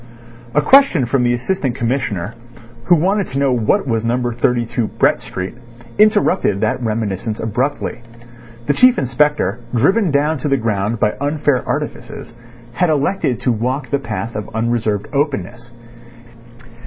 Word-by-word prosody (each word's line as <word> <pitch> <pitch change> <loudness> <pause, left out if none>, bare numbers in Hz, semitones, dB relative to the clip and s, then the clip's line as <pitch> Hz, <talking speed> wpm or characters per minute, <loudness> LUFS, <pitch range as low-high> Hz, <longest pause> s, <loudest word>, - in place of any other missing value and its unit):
A 150 - +3
question 265 - +5
from 125 +2 0
the 120 0 +2
Assistant 130 0 -2
Commissioner, 115 -6 -2 0.5
who 175 - +5
wanted 195 +4 +1
to 135 - -5
know 140 -1 +2
what 115 0 +1
was 115 -4 -1
No. 120 +1 0
32 120 -1 0
Brett - - +1
Street, 90 +1 -6 0.5
interrupted 205 - +3
that 110 +4 -1
reminiscence 110 -2 -2
abruptly. 120 +2 -2 0.6
The 145 - +2
Chief 250 - +5
Inspector, 130 -4 +1 0.2
driven 190 - +3
down 150 +1 +1
to 140 - -3
the 140 -1 +2
ground 110 -1 -1
by 105 - +2
unfair 145 -2 0
artifices, 115 - -5 0.4
had 180 +7 +1
elected 145 -4 0
to 125 - +1
walk 125 +3 -2
the 140 - +1
path 115 -2 -5
of 105 0 -5
unreserved 110 -3 -1
openness. 120 - -2
125 Hz, 140 wpm, -18 LUFS, 115-145 Hz, 0.6 s, question